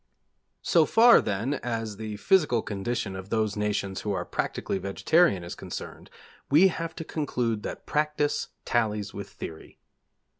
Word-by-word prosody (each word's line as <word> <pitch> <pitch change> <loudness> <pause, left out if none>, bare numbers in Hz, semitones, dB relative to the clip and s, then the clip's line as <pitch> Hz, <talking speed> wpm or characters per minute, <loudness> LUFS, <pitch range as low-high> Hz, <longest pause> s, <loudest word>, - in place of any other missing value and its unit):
So - - +4
far, 235 +1 +7
then, 110 +6 -1
as 115 -3 -3
the 110 -1 -5
physical 150 - +3
condition 105 0 -3
of 95 +1 -8
those 110 -2 0
nations 105 -2 -2
who 105 - -2
are - - -2
practically 95 - -2
vegetarian 100 - +2
is 85 - -6
concerned, - - -8 0.4
we 165 +7 +6
have 165 -1 -5
to 165 - -5
conclude 125 -9 -2
that - - -6
practice 150 -1 0 0.2
tallies 105 -3 0
with 100 0 -7
theory. 80 -1 -9
110 Hz, 145 wpm, -27 LUFS, 100-150 Hz, 0.4 s, far